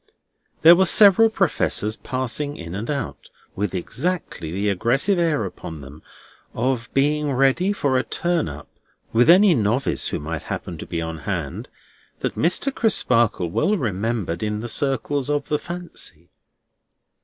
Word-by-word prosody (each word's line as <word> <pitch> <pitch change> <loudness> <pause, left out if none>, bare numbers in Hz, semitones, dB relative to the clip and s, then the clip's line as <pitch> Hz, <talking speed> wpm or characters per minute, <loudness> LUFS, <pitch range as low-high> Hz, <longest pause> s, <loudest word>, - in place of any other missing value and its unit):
There 170 +2 +9
were 190 +1 +3
several 210 +3 +7
Professors 150 - 0
passing 130 +4 -3
in 85 -1 -8
and 105 +4 -5
out, 140 -5 -4 0.3
with 100 -1 -2
exactly 125 - -3
the 100 +4 -2
aggressive 125 - +1
air 155 -10 +1
upon 80 -4 -8
them 70 +3 -12 0.5
of 125 -2 -1
being 145 +1 +1
ready 135 +9 +2
for 140 -10 0
a - - -1
turn 175 - -1
up 75 +1 -10 0.5
with 120 +6 +4
any 185 +2 +7
Novice 120 +1 0
who - - -2
might 80 +1 -5
happen - - -5
to - - -8
be 85 -1 -3
on 80 -1 -5
hand, 70 - -5 0.5
that - - -2
Mr. 180 - +1
Crisparkle 120 - +1
well 210 - +1
remembered 105 - -2
in 105 -1 -2
the 120 - -5
circles 135 +2 -1
of 145 -1 -1
the 150 - 0
Fancy. 170 - -7
130 Hz, 150 wpm, -22 LUFS, 100-165 Hz, 0.5 s, There